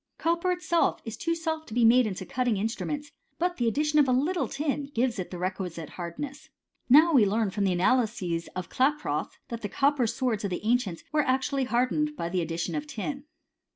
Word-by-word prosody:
Copper 340 +2 +1
itself 350 -1 +1
is 225 0 -5
too 335 0 -1
soft 320 -1 -3
to 220 - -7
be 240 -1 +4
made 240 +1 +6
into 190 -2 -5
cutting 245 -2 0
instruments; 285 +8 -3 0.3
but 355 +1 0
the 240 - +1
addition 300 +5 +2
of 285 - +5
a - - +2
little 305 +8 +1
tin 285 -1 -2
gives 235 -2 +1
it 185 - -4
the 180 - -6
requisite 180 -3 -4
hardness. 260 +12 -7 0.4
Now 315 +6 +7
we 255 -6 +7
learn 210 0 +1
from 200 0 0
the 190 - +2
analyses 185 -4 +1
of 185 -1 -4
Klaproth, 290 - 0
that 235 -2 -5
the 205 - -3
copper 275 -1 +2
swords 225 -3 -1
of 200 - -1
the 180 +3 -4
ancients 225 -7 0
were 305 - +3
actually 265 0 0
hardened 255 +5 +1
by 170 - -3
the 180 0 0
addition 165 +1 -3
of 150 -1 -3
tin. 275 - -5
245 Hz, 200 wpm, -27 LUFS, 195-295 Hz, 0.4 s, Now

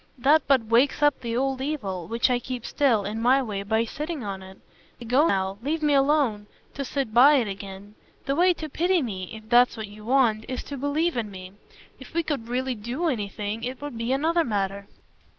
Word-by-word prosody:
That 290 +5 +4
but 265 -5 +3
wakes 245 +6 +2
up 290 -1 +3
the 235 -1 -2
old 265 0 -1
evil, 205 - -3
which 230 +3 +1
I 245 - +2
keep 245 -1 -6
still, 240 -9 +2
in 215 +3 -3
my 255 +3 +4
way, 205 -5 -4
by 220 +3 0
sitting 300 +5 -5
by 200 -3 -4
it. 190 0 -12 0.4
I 240 - -9
go 265 +8 +3
now 190 -2 -1
leave 305 +5 -2
me 295 -1 +3
alone! 275 -7 +2 0.3
to 280 - -4
sit 270 -4 -3
by 270 +6 +7
it 245 -6 +2
again. 200 +1 -8 0.3
The 275 +1 0
way 355 +2 +4
to 315 - -6
pity 345 +3 +1
me 190 -6 -5
if 220 0 -10
that's 240 +1 +4
what 220 - -4
you 210 +1 -13
want 230 -3 +2
is 255 - -4
to 285 - -7
believe 290 +4 0
in 220 -3 -2
me. 185 -1 -9 0.5
If 265 +4 -13
we 335 - +2
could 280 -8 -3
really 255 +1 -1
DO 245 +10 -2
anything 210 -2 -3
it 255 +1 -4
would 290 -3 -6
be 230 +2 -2
another 325 +5 +2
matter." 200 -3 -2
245 Hz, 215 wpm, -25 LUFS, 210-285 Hz, 0.5 s, by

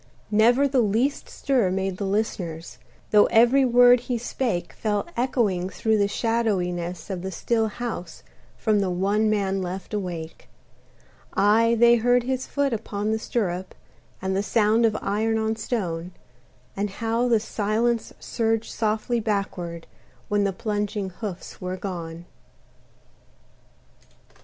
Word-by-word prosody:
Never 240 +6 +4
the 265 -2 +2
least 230 +7 0
stir 255 -9 +1
made 190 0 -2
the 200 - -2
listeners, 180 -5 -3 0.3
Though 210 -1 +6
every 240 +4 +5
word 245 0 +6
he 245 0 -3
spake 230 -5 -2
Fell 210 -2 -1
echoing 225 -8 0
through 220 +2 0
the 200 - +3
shadowiness 195 -6 -1
of 185 -2 -4
the 190 - -4
still 225 +4 0
house 215 -6 -6 0.3
From 215 -2 +2
the 195 -2 0
one 200 +4 +1
man 195 -2 0
left 185 +3 -6
awake: 175 -5 -5 0.9
Aye, 225 +3 +4
they 235 0 +6
heard 245 +1 +3
his 260 +1 -2
foot 280 -3 0
upon 210 -1 -2
the 220 - 0
stirrup, 190 -6 -2 0.5
And 190 0 -1
the 195 - +1
sound 220 +2 +3
of 215 -1 -1
iron 220 +2 0
on 220 0 0
stone, 180 -6 -3 0.6
And 205 +1 -1
how 230 +4 -1
the 230 -2 +4
silence 220 +2 -1
surged 225 -1 -1
softly 220 +2 0
backward, 190 -6 -3 0.4
When 205 -1 +2
the 200 - +1
plunging 205 0 -3
hoofs 185 -1 -7
were 185 0 -3
gone. 170 -3 -6
210 Hz, 135 wpm, -24 LUFS, 190-230 Hz, 0.9 s, Though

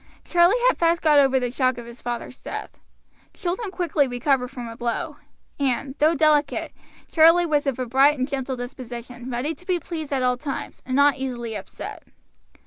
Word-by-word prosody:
Charlie 350 +5 +4
had - - +2
fast 335 0 +3
got 300 -2 +6
over 270 -1 +4
the 245 -1 -2
shock 255 -1 +1
of 240 - -7
his 235 +1 -11
father's 240 +1 -5
death; - - -7 0.6
children 385 +4 -3
quickly 345 -6 +1
recover 250 +1 +1
from 245 -2 -7
a 230 - -8
blow, 250 +6 -3 0.4
and, 265 0 0
though 315 +3 +4
delicate, 300 -1 +2 0.4
Charlie 330 +2 +6
was 295 -3 +1
of 270 - 0
a 255 - -2
bright 270 +5 +4
and 255 0 -1
gentle 265 -2 -3
disposition, 245 0 -8
ready 255 +6 -2
to 360 - -16
be 360 -2 +1
pleased 315 -4 -6
at 265 -2 0
all 250 0 +2
times, 275 +1 -6
and 255 - -1
not 285 0 +5
easily 240 -4 -4
upset. - - -7
270 Hz, 185 wpm, -24 LUFS, 245-315 Hz, 0.6 s, got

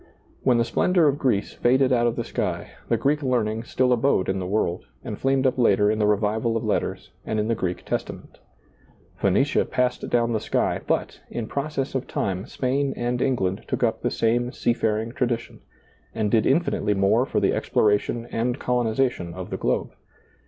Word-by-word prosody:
When 125 - +3
the 115 - +2
splendor 175 +7 +3
of 145 0 +1
Greece 120 -7 0
faded 130 +2 +3
out 120 -1 +3
of 115 - 0
the 120 - -2
sky, - - -3 0.2
the 115 - +3
Greek 145 +6 +1
learning 115 -4 0
still 125 +1 +2
abode 120 -6 +2
in 95 0 0
the 90 - -3
world, 95 -3 -1 0.2
and - - -5
flamed 135 0 +1
up 130 0 +1
later 105 -3 +4
in 110 - -1
the 105 - +3
revival 110 +2 +1
of - - -4
letters - - -2
and 110 - -2
in 105 - 0
the - - +3
Greek 90 -5 -3
Testa - - -2
ment - - -15 0.8
Phoenicia 105 +9 +2
passed 125 -1 -1
down 120 -1 +2
the 110 - +1
sky, - - 0
but, - - -1
in 120 - -4
process 140 +2 -3
of 130 - -2
time, 95 0 -2
Spain 135 +1 -1
and 120 +1 -1
England 100 -8 0
took - - -2
up 110 -1 +1
the - - 0
same 120 +2 +1
sea 120 - 0
faring 110 0 -1
tradition, 120 -3 -2 0.6
and 110 -2 0
did 110 -2 +3
infinitely 135 -8 +1
more 100 +5 +3
for - - 0
the - - +2
exploration 105 +3 +1
and 120 +3 -1
colonization 120 -8 0
of - - -7
the - - -2
globe. - - -1
115 Hz, 190 wpm, -24 LUFS, 105-130 Hz, 0.8 s, later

